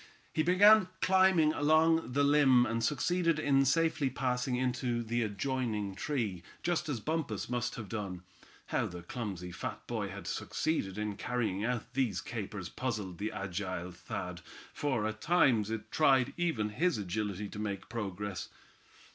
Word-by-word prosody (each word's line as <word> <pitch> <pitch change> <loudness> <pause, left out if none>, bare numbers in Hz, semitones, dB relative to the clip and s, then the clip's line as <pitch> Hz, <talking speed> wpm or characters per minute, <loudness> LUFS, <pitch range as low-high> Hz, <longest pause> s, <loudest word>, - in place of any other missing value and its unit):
He 155 - +2
began 190 +4 +6
climbing 185 -5 +4
along 160 -1 +3
the 145 +2 +3
limb, 140 -4 +5
and 115 0 -1
succeeded 165 +5 +1
in 140 -3 +3
safely 160 -1 +2
passing 125 0 -1
into 125 -1 0
the 120 +2 -1
adjoining 110 -1 -2
tree, 105 - -2 0.2
just 175 -3 0
as 130 -6 -1
Bumpus 155 +2 -2
must 120 0 -1
have 110 -3 -6
done. 95 -4 -5 0.5
How - - +2
the 90 -1 -8
clumsy 95 -4 -5
fat - - -6
boy - - -3
had - - -8
succeeded 105 - -2
in 105 -1 -3
carrying 115 -5 -1
out 120 -1 -2
these 125 -9 0
capers 105 -5 -5
puzzled 105 -6 -4
the 105 +2 -2
agile 95 -2 -4
Thad, 90 0 -6 0.3
for 130 -7 0
at 110 0 -4
times 130 - +3
it 110 0 -5
tried 135 -3 +4
even 160 -12 0
his 165 +9 +1
agility 105 0 -3
to - - -8
make 100 -2 -4
progress. 105 -3 -4
120 Hz, 150 wpm, -32 LUFS, 105-145 Hz, 0.5 s, began